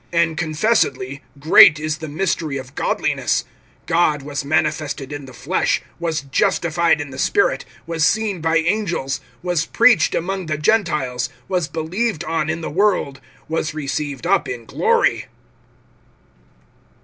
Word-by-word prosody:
(16)And 170 Hz, -1 st, +2 dB
confessedly, 155 Hz, -, 0 dB, 0.2 s
great 155 Hz, +1 st, +7 dB
is 155 Hz, 0 st, -3 dB
the 160 Hz, -, -6 dB
mystery 155 Hz, -2 st, -2 dB
of 130 Hz, -1 st, -9 dB
godliness; -, -, 0 dB, 0.4 s
God 155 Hz, -4 st, +2 dB
was 145 Hz, -1 st, -4 dB
manifested[3:16] 150 Hz, -1 st, -1 dB
in 145 Hz, -1 st, -6 dB
the 130 Hz, -, -11 dB
flesh, 135 Hz, +9 st, 0 dB, 0.2 s
was 165 Hz, -2 st, -1 dB
justified 160 Hz, +4 st, +1 dB
in 145 Hz, -2 st, -5 dB
the 130 Hz, -, -8 dB
Spirit, 405 Hz, -, +1 dB, 0.2 s
was 165 Hz, -2 st, -2 dB
seen 205 Hz, 0 st, +1 dB
by 165 Hz, +1 st, +2 dB
angels, 165 Hz, -7 st, -1 dB, 0.2 s
was 175 Hz, -3 st, 0 dB
preached 230 Hz, -8 st, +4 dB
among 185 Hz, +1 st, -2 dB
the 155 Hz, -1 st, -1 dB
Gentiles, 150 Hz, -, 0 dB, 0.2 s
was 180 Hz, -5 st, -1 dB
believed 170 Hz, +5 st, -2 dB
on 160 Hz, -1 st, -1 dB
in 160 Hz, +1 st, -2 dB
the -, -, -5 dB
world, 175 Hz, -7 st, +1 dB, 0.3 s
was 155 Hz, -1 st, -2 dB
received 145 Hz, -1 st, -4 dB
up 195 Hz, +2 st, +2 dB
in 120 Hz, -2 st, -6 dB
glory. 465 Hz, -, +1 dB
160 Hz, 135 wpm, -20 LUFS, 145-175 Hz, 0.4 s, great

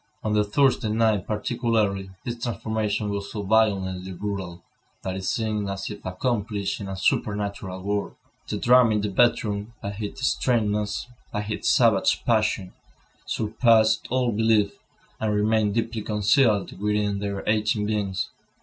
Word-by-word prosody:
On 110 Hz, -, 0 dB
the 105 Hz, 0 st, +3 dB
Thursday 125 Hz, +1 st, +2 dB
night, 110 Hz, -3 st, +1 dB
particularly, 110 Hz, -3 st, 0 dB
this 120 Hz, -1 st, -5 dB
transformation 110 Hz, -3 st, -2 dB
was 100 Hz, 0 st, -4 dB
so 105 Hz, -, -4 dB
violently 95 Hz, -3 st, +1 dB
brutal, 95 Hz, -3 st, -5 dB, 0.4 s
that 95 Hz, -1 st, -3 dB
it 95 Hz, -, -5 dB
seemed 105 Hz, -1 st, -1 dB
as 100 Hz, +2 st, -4 dB
if 105 Hz, -, -9 dB
accomplished 105 Hz, +1 st, -2 dB
in 100 Hz, -, -5 dB
a 95 Hz, -, -4 dB
supernatural 100 Hz, -1 st, -1 dB
world. 100 Hz, +1 st, -2 dB, 0.3 s
The -, -, -2 dB
drama 120 Hz, -2 st, +5 dB
in 105 Hz, -, +1 dB
the 105 Hz, -, -1 dB
bedroom, 105 Hz, -1 st, +1 dB
by 100 Hz, 0 st, -5 dB
its 110 Hz, +4 st, -4 dB
strangeness, 105 Hz, -5 st, 0 dB, 0.3 s
by 105 Hz, -, -2 dB
its 105 Hz, 0 st, -2 dB
savage 115 Hz, -6 st, +3 dB
passion, 110 Hz, -5 st, +1 dB, 0.5 s
surpassed 110 Hz, 0 st, +3 dB
all 125 Hz, -1 st, +1 dB
belief, 110 Hz, -2 st, +3 dB, 0.5 s
and 105 Hz, -1 st, 0 dB
remained 105 Hz, 0 st, +2 dB
deeply 115 Hz, -1 st, -1 dB
concealed 105 Hz, -1 st, +2 dB
within 105 Hz, -1 st, 0 dB
their 100 Hz, -1 st, -3 dB
aching 105 Hz, 0 st, +1 dB
beings. 100 Hz, -3 st, -2 dB
105 Hz, 140 wpm, -25 LUFS, 100-110 Hz, 0.5 s, drama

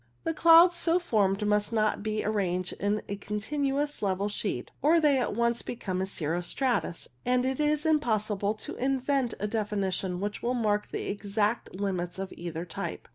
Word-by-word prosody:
The 325 Hz, -, -1 dB
clouds 335 Hz, +2 st, +7 dB
so 340 Hz, 0 st, +3 dB
formed 210 Hz, -, +1 dB
must 210 Hz, +1 st, +1 dB
not 215 Hz, -2 st, +1 dB
be 215 Hz, 0 st, -2 dB
arranged 185 Hz, -4 st, -1 dB
in 205 Hz, +2 st, 0 dB
a 200 Hz, -, -4 dB
continuous 275 Hz, +8 st, -2 dB
level 200 Hz, 0 st, 0 dB
sheet, 200 Hz, -, -3 dB
or 315 Hz, +5 st, +5 dB
they 290 Hz, -4 st, +4 dB
at 245 Hz, -, -1 dB
once 235 Hz, +1 st, +1 dB
become 190 Hz, -6 st, -3 dB
cirro 170 Hz, -2 st, -2 dB
stratus, 235 Hz, -2 st, -1 dB, 0.2 s
and 250 Hz, 0 st, +2 dB
it 265 Hz, +1 st, -1 dB
is 300 Hz, 0 st, +1 dB
impossible 215 Hz, -9 st, +1 dB
to -, -, -6 dB
invent 265 Hz, -1 st, 0 dB
a 210 Hz, -, -1 dB
definition 200 Hz, -4 st, -1 dB
which 205 Hz, +1 st, -3 dB
will 245 Hz, +2 st, 0 dB
mark 210 Hz, -3 st, 0 dB
the -, -, -4 dB
exact 205 Hz, +1 st, -1 dB
limits 185 Hz, -3 st, -2 dB
of 190 Hz, 0 st, -5 dB
either 170 Hz, 0 st, -5 dB
type. 170 Hz, -, -6 dB
215 Hz, 170 wpm, -28 LUFS, 195-265 Hz, 0.2 s, clouds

